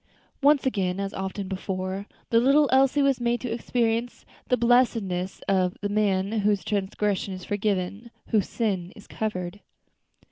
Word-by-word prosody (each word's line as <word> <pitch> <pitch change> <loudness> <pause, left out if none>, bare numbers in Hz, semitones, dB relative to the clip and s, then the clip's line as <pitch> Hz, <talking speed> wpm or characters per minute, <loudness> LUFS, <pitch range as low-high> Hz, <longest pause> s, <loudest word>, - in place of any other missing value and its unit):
Once 285 0 +4
again, 195 -7 0
as 195 0 -3
often 190 +1 -4
before, 190 +1 -4 0.2
the 230 - +5
little 280 +4 +5
Elsie 270 +2 +4
was 275 -3 +2
made 240 0 +1
to 250 - -4
experience 235 0 -1 0.2
the 250 - +2
blessedness 230 -7 +1
of 185 -2 +1
"the 205 - -1
man 200 -2 +1
whose 205 -1 +1
transgression 200 -1 -1
is 185 - -9
forgiven, 205 +2 -2 0.2
whose 210 -4 +1
sin 190 -6 -1
is 210 - -13
covered." 200 -3 -4
205 Hz, 145 wpm, -26 LUFS, 190-240 Hz, 0.2 s, the